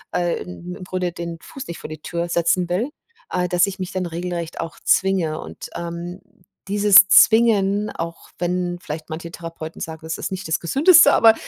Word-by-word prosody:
äh, 175 -1 0
im 180 0 -9
im - - -10
Grunde 180 -1 -3
den 170 0 -6
Fuß 270 - -9
nicht 170 - -6
vor - - -8
die 155 -1 -9
Tür 170 +2 -3
setzen 170 +1 +1
will, 200 +10 -1 0.4
äh, 180 0 -1
dass 180 +1 +2
ich 195 -1 -5
mich 185 0 -4
dann 185 -1 -2
regelrecht 170 -1 -5
auch 165 0 -7
zwinge 185 -5 +2
und, - - -9
ähm, 170 +2 -6 0.5
dieses 200 -1 +7
Zwingen, 210 -2 +4
auch 165 0 -7
wenn 175 0 -1
vielleicht 155 -1 -7
manche 165 +1 -6
Therapeuten 165 -1 -8
sagen, 160 -1 -6
das 160 0 -4
ist - - -5
nicht 190 -3 -5
das 160 - +1
Gesündeste, 285 - +6
aber, 225 -1 +7
175 Hz, 190 wpm, -21 LUFS, 170-190 Hz, 0.5 s, dieses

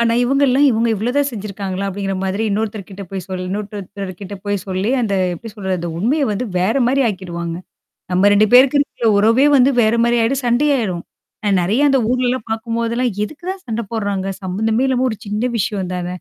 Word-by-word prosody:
ஆனா 230 0 +3
இவங்கல்லாம், 275 +1 +3
"இவுங்க 230 0 +1
இவ்வளதான் 250 +7 0
செஞ்சுருக்காங்களா?" 200 -3 -4
அப்படிங்கிற 195 0 -3
மாதிரி 190 +3 -1
இன்னொருத்தர்கிட்ட 205 -2 -4
போய் 190 -2 -5
சொல் 185 -1 -4
இன்னொருத்தர்கிட்ட 200 -1 -6
போய் 205 0 0
சொல்லி, 190 +3 -1
அந்த 215 -4 0 0.2
எப்படி 225 +6 -9
சொல்றது? 190 -3 -2
அந்த 170 - -4
உண்மைய 260 - +1
வந்து 210 +5 -2
வேற 190 +8 +1
மாரி 270 +2 +2
ஆக்கிடுவாங்க. 170 -4 -4 0.6
நம்ம 185 +3 +4
2 205 +1 +5
பேருக்கு 260 +3 +7
இருக்கற 240 -5 -1
உறவே 225 +7 +4
வந்து 260 +1 +5
வேற 220 +1 +3
மாரி 235 0 +2
ஆயிடும், 265 +4 0
சண்டையாயிரும். 240 -8 +1 0.4
அ - - +3
நெறைய 200 +9 +1
அந்த 270 -1 +3
ஊர்லலாம் 255 -1 0
பார்க்கும்போதெல்லாம், 230 +2 -1
"எதுக்கு 310 +10 -11
தான் 380 0 -6
சண்ட 225 0 -2
போடுறாங்க? 200 -4 -2 0.2
சம்மந்தமே 220 +6 0
இல்லாம 260 -1 +1
ஒரு 220 - -4
சின்ன 210 +4 -1
விஷயம் 195 -3 -2
தான! 180 -1 -3
215 Hz, 175 wpm, -18 LUFS, 195-245 Hz, 0.6 s, பேருக்கு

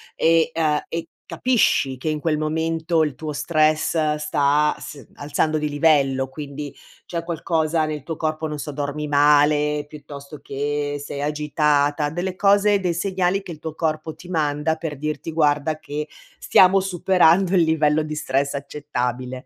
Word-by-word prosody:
e 165 0 +3
uhm, 155 -2 +1
e 165 0 -4 0.2
capisci 215 - +1
che 155 - -2
in 155 - -1
quel 155 0 0
momento 160 +1 0
il 150 -2 -1
tuo 150 +3 -6
stress 155 0 +1
sta 150 0 +1
s 140 -5 -10
alzando 150 +2 -1
di 150 - -2
livello? 145 -3 +2
Quindi, 145 +1 -7 0.3
c'è 170 -1 -4
qualcosa 160 -1 0
nel 150 -1 -4
tuo 160 +4 -5
corpo 155 0 -2
non 150 -1 -5
so, 150 +1 -5
dormi 145 +1 -4
male, 150 0 +3
piuttosto 145 -1 -11
che 145 +1 -3
sei 140 0 -6
agitata. 150 0 +1
Delle 180 +3 -3
cose, 200 +1 +3
dei 180 -3 -1
segnali 190 +1 0
che 185 - -8
il 155 - -9
tuo 160 -1 -6
corpo 155 0 -2
ti 175 - -14
manda 155 -2 0
per 160 -3 -5
dirti: 155 +2 -4
"Guarda 150 -1 +1
che 150 0 -5 0.3
stiamo 190 +1 +5
superando 185 -1 +3
il 180 - +5
livello 155 -1 +2
di 155 0 -5
stress 140 -1 -1
accettabile." 130 -3 -4
150 Hz, 155 wpm, -22 LUFS, 145-165 Hz, 0.3 s, stiamo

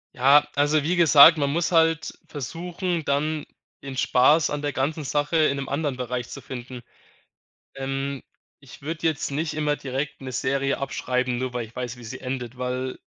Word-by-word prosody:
Ja, 140 +4 +5
also, 145 +1 +2
wie 175 +4 +1
gesagt, 160 -1 +8
man 140 -1 +1
muss 170 +4 0
halt 165 -2 +2
versuchen, 170 +5 -4
dann 150 +2 -1 0.3
den 135 -2 -7
Spaß 145 +6 +4
an 145 0 -2
der 145 0 -1
ganzen 150 +4 -2
Sache 145 +3 0
in 155 -3 +3
'nem 135 -1 -4
anderen 140 -2 -2
Bereich 125 -1 -4
zu - - -7
finden. 125 -1 -8 0.9
Ähm, 135 0 -3 0.4
ich 140 -3 -14
würde 155 +3 -3
jetzt 155 -3 -1
nicht 155 +3 -2
immer 150 -1 0
direkt 140 +2 -4
'ne 130 -1 -6
Serie 135 +2 0
abschreiben, 125 -2 -1
nur 130 0 -3
weil 120 -2 -3
ich 110 - -20
weiß, 125 -1 -5
wie 120 - -11
sie 110 - -7
endet, 125 -2 -5
weil 125 +1 -3
140 Hz, 180 wpm, -24 LUFS, 130-155 Hz, 0.9 s, gesagt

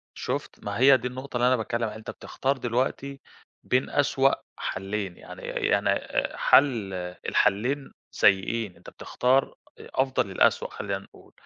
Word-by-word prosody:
شُفت، - - -5
ما 100 +1 -3
هي 135 +1 +7
دي 125 0 -3
النقطة 130 0 -7
اللي 120 +1 +3
أنا 130 - +4
باتكلم 115 +1 -2
عليها، 110 0 -4
أنت 110 - -7
بتختار 135 +1 -2
دلوقتي 130 +3 -2 0.4
بين 125 +1 +1
أسوأ 135 -1 +3 0.3
حلين، 95 -1 -4
يعني - - -11
يعني - - +1 0.5
حل 115 -9 +4 0.4
الحلين 130 +8 +1 0.2
سيئين، 100 +1 +2
أنت - - -13
بتختار 130 +2 +1 0.2
أفضل 130 -7 -1
الأسوأ 95 - +2
خلّينا - - -3
نقول، - - -18
125 Hz, 135 wpm, -26 LUFS, 105-135 Hz, 0.5 s, هي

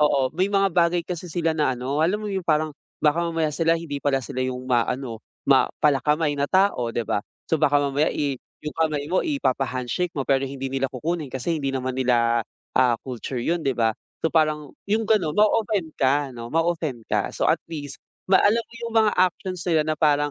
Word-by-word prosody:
oo, 140 -3 +3
may 185 +5 +1
mga 195 -2 +2
bagay 170 0 +3
kasi 180 0 -5
sila 165 -1 0
na 150 -5 +1
ano 130 +4 -2
alam 195 +7 +1
mo - - -3
'yun, 190 -1 -2
parang 155 0 +2 0.3
baka 150 +2 +3
mamaya 165 -2 0
sila 165 +2 +2
hindi 160 -4 -4
pala 135 -2 0
sila 130 +1 -6
yung 125 0 -4
maano, 125 -1 -1 0.2
ma - - +4 0.2
pala-kamay 150 +1 +2
na 140 - +1
tao 190 -10 +2
'di 120 - 0
ba? 105 - 0 0.3
So 160 - +3
baka 145 - +4
mamaya, 145 +2 +1
ih, 140 -3 -2 0.2
yung 150 - -4
kamay 155 -3 +1
mo 185 - +3
ipapa-handshake 135 - -1
mo 140 - -1
pero 135 0 +1
hindi 135 0 -5
nila 135 0 0
kukunin 155 +5 -3
kasi 155 +6 -2
hindi 135 -1 -2
naman 130 0 -2
nila, 120 -2 +3 0.4
ah, 125 -2 +5
culture 125 -1 -5
yun 170 +5 +1
'di 135 -4 0
ba. 115 -1 +3 0.3
So 160 - +1
parang 155 -2 +1 0.2
yung 215 +2 +1
gano'n 195 -8 +1
ma-o-offend 210 -5 +2
ka 140 +1 +2
'no, 115 -1 -8
ma-o-offend 160 -5 -1
ka - - 0
so - - -4
at - - +3
least 145 -4 -7 0.3
ma 190 - +7
alam 225 +3 +3
mo 235 - -20
yung 230 - -6
mga 220 -2 +4
actions 185 0 0
nila 160 -3 +3
na 155 0 -1
parang 145 -1 +3
150 Hz, 205 wpm, -24 LUFS, 135-170 Hz, 0.4 s, ma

